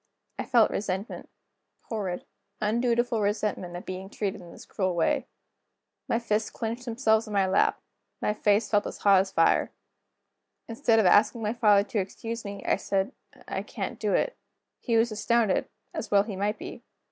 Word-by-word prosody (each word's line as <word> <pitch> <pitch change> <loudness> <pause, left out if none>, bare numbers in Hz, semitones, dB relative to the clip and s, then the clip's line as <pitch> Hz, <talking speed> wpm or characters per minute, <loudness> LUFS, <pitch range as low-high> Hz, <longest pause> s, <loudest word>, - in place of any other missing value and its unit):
I - - -2
felt 235 -3 +4
resentment; 195 +1 -4 0.5
horrid, 195 -6 -4 0.3
undutiful 235 +1 +1
resentment, 205 -3 -1
at 175 - -7
being 185 +1 -6
treated 205 -1 -3
in 175 -1 -12
this - - -12
cruel 185 -3 -1
way. 165 - +1 0.8
My - - +2
fists 220 -2 0
clinched 230 +2 -4
themselves 225 -2 +2
in 210 - -6
my 195 -1 +3
lap, 190 +1 +2 0.4
my 210 - 0
face 210 +1 +2
felt 205 -1 +1
as - - -7
hot 200 -2 +5
as 190 0 -5
fire. 165 -3 +3 1.0
Instead 230 0 +2
of 220 - +4
asking 210 +5 +4
my 210 +1 0
father 210 -4 +4
to 215 - 0
excuse 225 +4 -5
me, 200 -1 -7
I - - +2
said: 195 +4 -1 0.4
"I - - -2
can't - - -5
do - - +1
it." - - 0 0.4
He 230 -3 +1
was 230 +1 +3
astounded, 215 -1 +1 0.2
as - - -5
well 200 -1 +5
he 210 -2 -6
might 205 +3 -1
be. - - -8
210 Hz, 170 wpm, -27 LUFS, 195-225 Hz, 1.0 s, hot